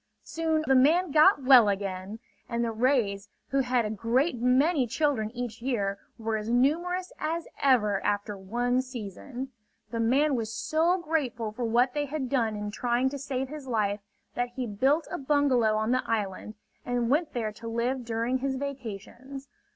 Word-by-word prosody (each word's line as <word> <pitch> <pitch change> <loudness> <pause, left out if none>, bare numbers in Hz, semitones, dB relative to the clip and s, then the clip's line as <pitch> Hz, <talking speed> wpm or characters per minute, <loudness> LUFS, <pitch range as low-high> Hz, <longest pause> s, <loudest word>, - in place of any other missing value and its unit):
Soon 320 -1 -1
the 270 - +3
man 310 +7 +4
got 305 0 +5
well 255 -5 +7
again. 195 +1 -3 0.3
And 235 0 0
the 230 - -1
rays, 220 -4 0 0.2
who 275 - +1
have 250 -3 +1
a 210 - -2
great 235 - +1
many 260 +3 +3
children 255 -4 0
each 235 -1 -6
year, 200 -6 -1 0.2
were 225 -1 -2
as 215 +1 -5
numerous 345 +9 +1
as 325 +2 -2 0.2
ever 210 -8 +3
after 205 0 -1
one 240 +6 0
season. 255 +2 -7 0.4
The 230 - -3
man 275 +6 +3
was 225 -4 -2
so 320 +10 +1
grateful 280 -10 -2
for 240 +3 -4
what 245 +3 +2
they 295 -1 -1
had 280 -2 -4
done 230 -5 +1
in 210 0 -4
trying 245 +4 0
to 280 +1 -6
save 265 -1 -3
his 295 -2 -8
life, 210 -4 0 0.3
that 245 0 -1
he 255 - -2
built 265 +9 +1
a 360 - -3
bungalow 265 -6 +2
on 220 +2 0
the 255 0 +2
island 215 -1 -2 0.3
and 245 -1 -1
went 305 +2 +1
there 225 -3 -2
to 230 +2 -10
live 240 +3 -1
during 230 +2 -1
his 270 0 -1
vacations. 265 0 -7
245 Hz, 175 wpm, -28 LUFS, 220-280 Hz, 0.4 s, well